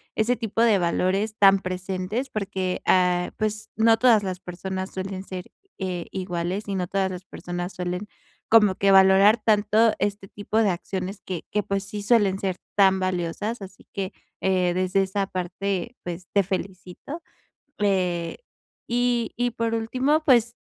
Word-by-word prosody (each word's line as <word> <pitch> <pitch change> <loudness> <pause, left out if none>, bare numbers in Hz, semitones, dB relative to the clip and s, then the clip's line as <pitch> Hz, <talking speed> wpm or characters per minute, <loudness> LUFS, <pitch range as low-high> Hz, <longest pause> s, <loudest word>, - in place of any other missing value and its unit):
ese 235 +3 +2
tipo 225 0 -2
de 225 -3 +5
valores 190 +4 0
tan 195 -1 +6
presentes, 185 +7 -3
porque, 190 -4 -3
ah, 180 -1 +3
pues 215 0 -2
no 225 +1 +4
todas 225 -3 +5
las 185 -2 -3
personas 190 +1 -5
suelen 190 0 -5
ser, 185 -2 -8 0.3
eh, 180 -3 -3
iguales 185 +2 -3
y 200 - -2
no 180 -2 -1
todas 190 0 0
las 180 0 -7
personas 175 0 -6
suelen 180 +3 -4 0.4
como 210 -4 +6
que 195 +1 +3
valorar 195 +3 +7
tanto 215 +1 +4
este 205 -1 -2
tipo 205 +2 -4
de 215 -3 +3
acciones 190 +2 -4
que 180 -4 -5
que 210 0 0
pues 195 0 -2
sí 205 +1 -6
suelen 205 -3 +3
ser 190 -2 -2 0.2
tan 190 -1 +5
valiosas. 185 +5 -2
Así 190 0 -13
que, 195 0 -4 0.3
eh, 185 -2 +1
desde 185 +1 +2
esa 195 +1 -1
parte 190 +4 -3
pues 175 0 -6
te 200 -1 +3
felicito, 190 - -6 0.6
eh, 180 -4 0 0.5
y 240 -1 0
y 245 0 +1
por 230 0 -2
último 260 +7 +1
pues 235 -3 +4
195 Hz, 155 wpm, -24 LUFS, 185-215 Hz, 0.6 s, valorar